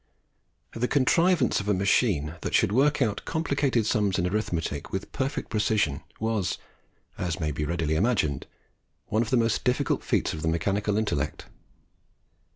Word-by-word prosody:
The 120 +2 -1
contrivance 150 +1 +3
of 105 0 -4
a 105 - +3
machine 95 - +2
that - - -1
should - - +3
work 140 +4 +3
out 105 -3 -2
complicated 140 -7 0
sums 105 -4 +1
in 90 - 0
arithmetic 90 -7 -2
with 95 - -4
perfect 135 +1 -3
precision, 105 -9 +1 0.2
was, 110 -4 -1 0.6
as 90 -3 -2
may 75 -2 -1
readily 75 +1 -1
be - - +1
imagined, 85 - 0 0.6
one 110 - +2
of 115 - -2
the 130 - +3
most 115 -1 +1
difficult 125 -1 +1
feats - - 0
of 80 - -5
the 80 - -2
mechanical 100 +5 0
intellect. 105 -11 -2
105 Hz, 155 wpm, -27 LUFS, 85-125 Hz, 0.6 s, contrivance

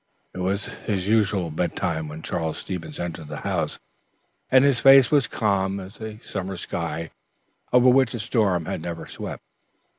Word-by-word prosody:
It - - -7
was 95 +3 -1
his 95 -3 -3
usual 100 -6 +2
bedtime 80 0 -1
when 75 +1 -8
Charles 80 -1 -2
Stevens 90 -4 -6
entered 85 -2 -5
the - - -6
house, - - -1 0.7
and 130 0 +6
his 135 -4 +3
face 135 -2 +7
was 145 -4 +4
calm 100 -2 0
as 95 +4 -11
a 110 -1 -6
summer 95 -1 -4
sky 85 -1 -4 0.6
over 125 0 +5
which 130 -1 +4
a - - -4
storm 105 -6 +1
had - - -3
never 85 0 -5
swept. - - -7
95 Hz, 160 wpm, -24 LUFS, 85-115 Hz, 0.7 s, face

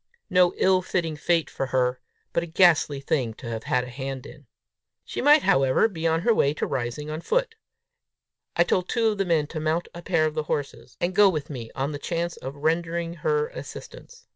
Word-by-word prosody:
no 180 -1 +4
ill 185 -1 +3
fitting 170 -3 -2
fate 165 +1 +1
for 135 - -4
her, 125 -1 +1 0.3
but 170 - +2
a 170 - -5
ghastly 160 -4 +4
thing 130 -5 -1
to 120 - -10 0.2
have 125 0 +1
a - - -7
hand 135 +1 -6
in! 145 -4 -13 0.6
She - - -4
might, 295 +2 +6
however, 135 +9 +4
be 165 -6 -3
on 165 0 +1
her 230 +5 +3
way 145 -8 +2
to - - -1
Rising 130 +5 -3
on 155 +1 -4
foot! - - 0 1.0
I 170 - +5
told 180 +1 0
two 230 -2 +2
of 210 -2 -3
the 195 - +1
men 165 -4 +2
to 155 +2 -6
mount 160 +2 -1
a 170 - -8
pair 170 -3 +1
of 155 - -1
the 155 - -1
horses, 145 -2 -4
and 175 +2 -1
go 205 +1 +6
with 155 -5 -3
me 120 -5 -6
on 135 +2 -1
the 145 - -5
chance 170 +2 -2
of 135 +2 -7
rendering 165 +3 -1
her 455 0 +1
assistance. - - -10
165 Hz, 210 wpm, -25 LUFS, 140-180 Hz, 1.0 s, might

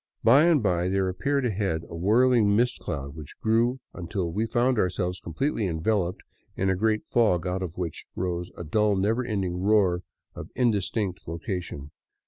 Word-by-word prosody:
By 135 +8 +6
and 160 -8 +4
by 90 -2 +1
there 95 0 +1
appeared 140 +8 0
ahead 95 -7 -1
a 85 - -8
whirling 110 +3 +4
mist 120 +3 +1
cloud 70 0 -5
which 75 -2 -11
grew 115 +4 +2
until 85 -1 -3
we 110 +6 -1
found 120 +1 +2
ourselves 90 -1 -1
completely 105 - -2
enveloped 90 +2 -1 0.3
in 95 0 +1
a - - +1
great 110 +2 0
fog 105 -8 +2
out 90 +1 -2
of 90 -2 -5
which 85 -4 -4
rose 90 -1 -2
a - - -5
dull, 105 +5 +2
never 110 +6 +1
ending 95 -6 -2
roar 95 -3 +3 0.3
of - - -8
indistinct 105 -5 0
location. 85 -3 -5
95 Hz, 165 wpm, -26 LUFS, 90-115 Hz, 0.3 s, By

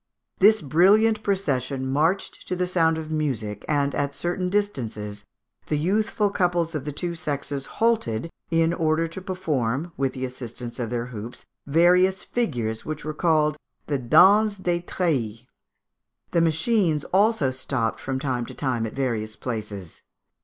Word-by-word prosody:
This 215 0 +5
brilliant 205 +9 +4
procession 140 - -1
marched 155 +8 0
to 180 - -1
the 180 0 0
sound 165 -3 +2
of 160 -1 -6
music, 120 -10 -2
and, 145 -2 +1
at 140 0 -1
certain 180 +1 -2
distances, 110 - -2 0.4
the 150 - 0
youthful 205 +5 +1
couples 175 -3 +1
of 150 -3 -4
the 150 - -3
two 170 +4 -2
sexes 145 -4 -3
halted, 165 - +1 0.2
in 165 0 +2
order 160 0 +1
to 165 +3 -8
perform, 160 -6 -2
with 135 -1 0
the 130 0 -3
assistance 120 -1 -7
of 120 -2 -2
their 120 0 -2
hoops, 120 -1 -8 0.2
various 180 +5 +4
figures, 120 - -2
which 155 -1 -5
were 155 - -3
called 155 -2 +2 0.3
the 140 -2 -1
Danse 200 - +5
des 175 -2 -1
Treilles. 125 - -1 0.9
The 170 - +3
machines 165 -1 +2
also 200 -8 +3
stopped 130 -3 -2
from 135 0 -3
time 130 -3 -2
to - - -9
time 120 -5 -1
at - - -8
various 115 -5 -2
places. 105 -7 -6
150 Hz, 150 wpm, -24 LUFS, 125-180 Hz, 0.9 s, This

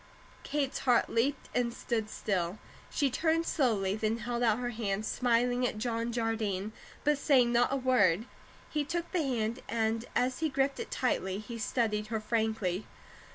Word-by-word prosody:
Kate's 285 -3 -1
heart 245 -3 +3
leaped 265 +4 0
and 245 -1 +1
stood 225 -2 -2
still. 185 -3 -1 0.3
She 280 -3 +1
turned 325 +4 +1
slowly, 210 -12 +1
then 220 +1 0
held 240 +1 -3
out 225 -3 +3
her 245 0 -2
hand, 215 -2 -2
smiling 245 +1 +2
at 215 - -4
John 230 +1 -1
Jardine, 220 -4 -1 0.3
but 295 -1 +2
saying 255 -5 +4
not 240 +1 +3
a - - +2
word. 230 -7 +3 0.5
He 300 -1 +1
took 340 +3 -2
her 360 - +2
hand, 240 -5 -1
and 225 0 0
as 255 +1 +1
he 320 -1 +1
gripped 270 0 0
it - - -4
tightly 190 -7 0
he 230 +3 -7
studied 215 -2 0
her 220 0 -1
frankly. 215 -4 -1
235 Hz, 165 wpm, -31 LUFS, 215-255 Hz, 0.5 s, saying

